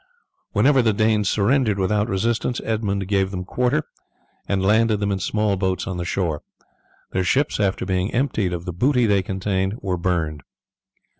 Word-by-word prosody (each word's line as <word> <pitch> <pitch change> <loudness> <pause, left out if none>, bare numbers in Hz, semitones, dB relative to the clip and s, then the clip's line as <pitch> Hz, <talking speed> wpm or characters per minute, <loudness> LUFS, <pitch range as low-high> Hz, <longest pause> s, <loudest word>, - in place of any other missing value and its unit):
Whenever 135 -1 +4
the 110 -2 +2
Danes 105 -1 +2
surrendered 110 0 +2
without 105 +3 +1
resistance 115 +5 0
Edmund 100 -4 -1
gave 95 -1 +1
them 90 -2 -5
quarter 125 +8 0 0.6
and 95 -1 0
landed 110 +1 +3
them 100 0 0
in 95 - -1
small 105 +1 0
boats 95 -1 -1
on 95 -2 -4
the 85 - -3
shore; 85 -4 -1 0.7
their 95 - 0
ships, 135 +10 +1
after 100 -2 0
being 95 +1 -1
emptied 115 -7 0
of 85 0 -4
the 90 - -4
booty 125 - +2
they 100 -3 +3
contained, 95 +1 -2
were 95 -2 -2
burned. 80 -4 -1
100 Hz, 165 wpm, -22 LUFS, 95-110 Hz, 0.7 s, Whenever